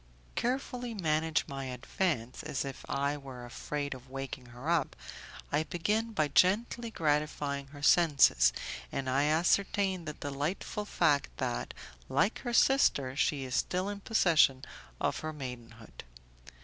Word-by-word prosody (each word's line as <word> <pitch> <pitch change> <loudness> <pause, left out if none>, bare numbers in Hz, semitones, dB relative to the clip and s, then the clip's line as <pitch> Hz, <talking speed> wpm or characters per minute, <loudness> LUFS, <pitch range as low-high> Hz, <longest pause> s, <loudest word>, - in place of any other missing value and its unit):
Carefully 245 -1 -2
managing 160 -4 +1
my 135 -1 -5
advance, 125 0 -2
as 135 - -3
if 135 -1 -7
I 140 +1 0
were 130 -3 -9
afraid 145 +4 -4
of 130 0 -12
waking 135 -1 -6
her 120 +4 -9
up, 170 -4 +1 0.6
I 145 - +2
begin 210 +8 -1
by 155 -8 +1
gently 225 +7 +2
gratifying 150 -5 -1
her 145 +1 -12
senses, 140 - +5 0.4
and 135 - -3
I 135 +3 +2
ascertain 185 +3 +2
the 150 - -4
delightful 145 +9 -3
fact 155 -8 +2
that, - - -3 0.3
like 215 - +2
her 240 - -4
sister, 190 - +3
she 140 0 +1
is 130 -1 -6
still 185 +8 0
in 205 0 -5
possession 160 -11 +3 0.3
of - - 0
her 155 - -4
maidenhood. 120 -6 -9
150 Hz, 135 wpm, -31 LUFS, 135-185 Hz, 0.6 s, senses